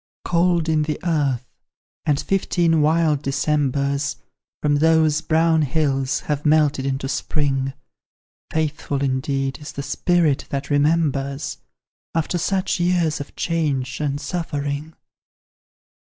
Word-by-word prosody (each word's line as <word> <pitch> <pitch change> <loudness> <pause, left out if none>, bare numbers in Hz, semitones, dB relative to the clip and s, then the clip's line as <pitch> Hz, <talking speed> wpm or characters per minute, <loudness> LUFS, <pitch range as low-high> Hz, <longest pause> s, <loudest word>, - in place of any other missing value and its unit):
Cold 170 -1 +2
in 155 -1 +2
the 150 -1 -2
earth 140 -7 +1 0.6
and 145 -2 +3
fifteen 170 -4 +1
wild 155 -1 +3
Decembers, 140 0 0 0.4
From 145 -1 +2
those 160 0 +3
brown 160 0 +3
hills, 135 -2 0
have 150 -1 -2
melted 150 -3 +3
into 135 0 -2
spring: 135 -1 -1 0.8
Faithful, 150 -3 -1
indeed, 135 0 -1
is 150 - -8
the 140 - -5
spirit 155 0 +1
that 140 +1 -3
remembers 145 -2 +1 0.6
After 165 +2 0
such 190 +2 0
years 175 -3 +1
of 140 - -10
change 140 -7 -1
and 145 -1 -1
suffering! 145 -1 -3
150 Hz, 110 wpm, -22 LUFS, 140-160 Hz, 0.8 s, and